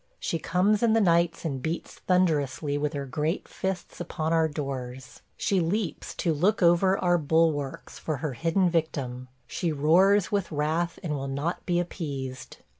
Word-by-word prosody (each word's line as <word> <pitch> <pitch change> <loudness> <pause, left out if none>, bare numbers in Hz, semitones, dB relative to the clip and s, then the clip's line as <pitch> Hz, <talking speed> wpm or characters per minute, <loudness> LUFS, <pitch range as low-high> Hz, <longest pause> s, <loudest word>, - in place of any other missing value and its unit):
She 165 - -2
comes 195 +6 +2
in 230 -2 +4
the 225 - +4
nights 170 -4 +2
and 135 -5 -2
beats 160 +5 -4
thunderously 150 -6 +1
with 145 +1 -1
her 140 -1 -3
great 150 +6 -2
fists 190 -2 -4
upon 160 -1 -2
our 165 -1 +3
doors. 130 -4 -6 0.2
She 200 -4 +1
leaps 175 0 -2
to 165 - 0
look 185 +7 +2
over 175 +3 +4
our 175 -1 +2
bulwarks 155 -3 0
for 155 -3 -2
her 145 0 -3
hidden 165 +8 +1
victim; 140 -7 -2 0.2
she 170 +6 -2
roars 180 +7 +4
with 200 -4 -1
wrath 160 +3 -1
and 160 -4 -2
will 135 -1 -4
not 140 +6 -3
be 175 -1 +2
appeased. 140 -7 -5
165 Hz, 165 wpm, -27 LUFS, 145-180 Hz, 0.2 s, in